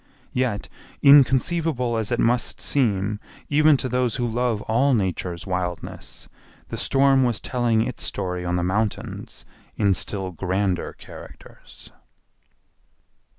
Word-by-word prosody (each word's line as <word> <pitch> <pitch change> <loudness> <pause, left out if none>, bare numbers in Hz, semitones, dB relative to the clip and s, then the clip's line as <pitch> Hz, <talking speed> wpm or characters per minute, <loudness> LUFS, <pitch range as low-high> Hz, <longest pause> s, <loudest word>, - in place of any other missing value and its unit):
Yet 125 -5 -1 0.4
inconceivable 140 -1 +4
as 110 -1 -2
it 120 - 0
must 120 0 +1
seem 105 -6 0 0.3
even 150 0 +5
to 130 - -3
those 125 -1 0
who 120 -2 -1
love 115 -2 -1
all 130 +5 +2
Nature's 90 -4 -2
wildness, 90 -2 -5 0.4
the - - -5
storm 135 -1 +3
was 120 -3 +1
telling 120 -3 0
its 125 - -6
story 90 -1 -3
on 90 0 -1
the 90 - 0
mountains 105 +4 -3 0.3
in 100 -2 +3
still 95 0 -2
grander 95 +1 -2
characters. - - -14
115 Hz, 120 wpm, -23 LUFS, 95-130 Hz, 0.4 s, even